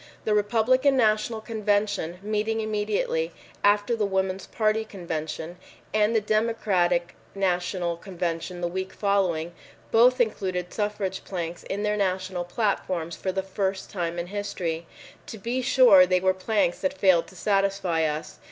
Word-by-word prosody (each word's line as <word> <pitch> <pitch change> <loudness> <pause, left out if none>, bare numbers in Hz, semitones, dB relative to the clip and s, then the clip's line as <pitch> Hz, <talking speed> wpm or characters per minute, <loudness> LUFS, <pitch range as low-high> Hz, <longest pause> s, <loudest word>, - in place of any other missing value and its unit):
The 215 - +2
Republican 240 +6 +3
National 220 -1 +2
Convention, 205 -5 -1
meeting 215 +1 -1
immediately. 210 -6 -1 0.3
after 205 +3 +3
the 220 - -1
Woman's 190 -1 -1
Party 215 0 +1
Convention, 170 -4 -5 0.4
and 215 +1 +3
the - - +5
Democratic 205 -5 +1 0.2
National 180 -2 0
Convention 175 -1 -4
the 175 - 0
week 190 +2 -4
following, 180 -5 0 0.4
both 250 +3 +5
included 185 -6 -1
suffrage 205 -3 -2
planks 170 -2 -5
in 200 +2 -3
their 210 0 +1
national 185 -2 -1
platforms 175 -4 -1
for 190 - -2
the 190 0 -2
first 190 0 -3
time 175 -3 -3
in 170 - -2
history. 175 -4 -4 0.4
To 220 - -7
be 235 +5 -2
sure, 240 -8 +7
they 185 0 +3
were 185 +1 +2
planks 190 -1 0
that 280 0 -2
failed 185 -4 +4
to 190 - -15
satisfy 195 -3 +1
us. 150 0 -4
195 Hz, 145 wpm, -26 LUFS, 175-215 Hz, 0.4 s, sure